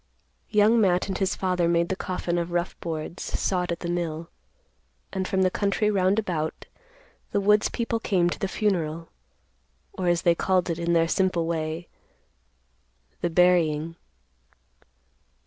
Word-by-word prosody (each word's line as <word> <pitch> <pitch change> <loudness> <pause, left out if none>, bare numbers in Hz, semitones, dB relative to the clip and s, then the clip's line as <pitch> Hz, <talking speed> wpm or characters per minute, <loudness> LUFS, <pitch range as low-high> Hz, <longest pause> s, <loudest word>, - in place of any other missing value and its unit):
Young 215 +2 +4
Matt 180 -2 +2
and 190 - -2
his 195 -2 0
father 180 -2 0
made 170 0 +2
the 190 - 0
coffin 180 -2 -2
of 170 0 -3
rough 175 +1 -1
boards, 165 +1 -5
sawed 180 -2 -1
at 170 - -4
the 175 - -3
mill; 170 -1 -3 0.8
and 190 -1 -2
from 190 -1 +1
the 185 - +2
country 205 +2 +1
round 190 0 +2
about, 170 -7 -2 0.6
the 205 - 0
woods 210 +1 +3
people 230 -1 -2
came 185 -6 +1
to 175 - -3
the 195 - -1
funeral, 170 -6 -1 0.8
or, 185 - -3
as 175 -1 +2
they 170 - +5
called 185 0 +1
it 165 - -3
in 170 0 0
their 165 -1 +3
simple 185 -2 +1
way, 160 0 -3 1.3
the 175 - -1
"burying." 165 -2 +3
175 Hz, 150 wpm, -25 LUFS, 170-190 Hz, 1.3 s, they